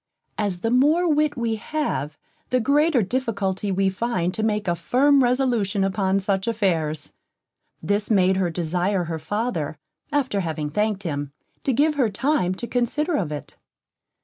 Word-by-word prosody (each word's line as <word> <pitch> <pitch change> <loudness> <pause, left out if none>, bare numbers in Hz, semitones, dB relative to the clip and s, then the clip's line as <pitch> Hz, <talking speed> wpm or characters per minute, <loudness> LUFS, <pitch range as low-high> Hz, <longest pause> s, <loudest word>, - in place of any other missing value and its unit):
As 195 -4 -1
the 225 - 0
more 300 +8 +4
wit 300 -2 +2
we 230 -2 -1
have, 210 - -3 0.3
the 255 - +2
greater 280 +1 +3
difficulty 200 -3 -1
we 190 +1 +2
find 185 -4 -1
to 220 - -2
make 210 -2 0
a 175 - +2
firm 270 - +3
resolution 240 -6 +1
upon 195 0 +1
such 195 0 -1
affairs, 165 -9 -1 0.7
this 205 +5 +1
made 190 -3 +3
her 185 -2 +1
desire 175 +3 0
her 165 -1 -4
father, 165 -3 -2 0.3
after 265 -8 0
having 160 -4 -3
thanked 210 +4 -1
him, 145 -4 -4 0.3
to 270 - +3
give 295 +5 +3
her 235 - +3
time 205 -4 0
to 240 - -5
consider 295 +8 0
of 170 - -1
it. 150 - -7
205 Hz, 155 wpm, -23 LUFS, 180-250 Hz, 0.7 s, more